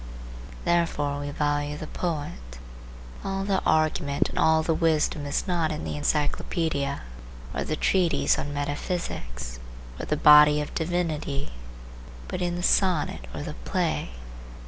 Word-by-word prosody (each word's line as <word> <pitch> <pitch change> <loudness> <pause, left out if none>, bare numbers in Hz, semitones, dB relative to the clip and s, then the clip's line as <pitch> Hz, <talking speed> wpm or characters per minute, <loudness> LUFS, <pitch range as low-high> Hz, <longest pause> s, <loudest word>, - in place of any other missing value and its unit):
Therefore 160 -4 +1
we 145 0 -4
value 145 0 -1
the 155 - -6
poet. 145 - -4 0.7
All 195 0 -2
the 195 -1 +1
argument 155 -2 +2
and - - -3
all 160 0 +4
the 165 - +1
wisdom 155 -3 +1
is 140 - -1
not 170 -3 +1
in 155 - -4
the - - -3
encyclopaedia, 145 -1 -1 0.5
or - - -1
the 155 - -2
treatise 180 +2 +2
on 145 - -4
metaphysics, 145 - -4 0.4
or - - -5
the - - 0
Body 150 0 +8
of 150 - -4
Divinity, 160 -4 -2 0.8
but 185 - -4
in 175 -1 0
the 175 - -4
sonnet 175 - +2
or - - -5
the - - -5
play. - - -1
150 Hz, 140 wpm, -26 LUFS, 145-170 Hz, 0.8 s, Body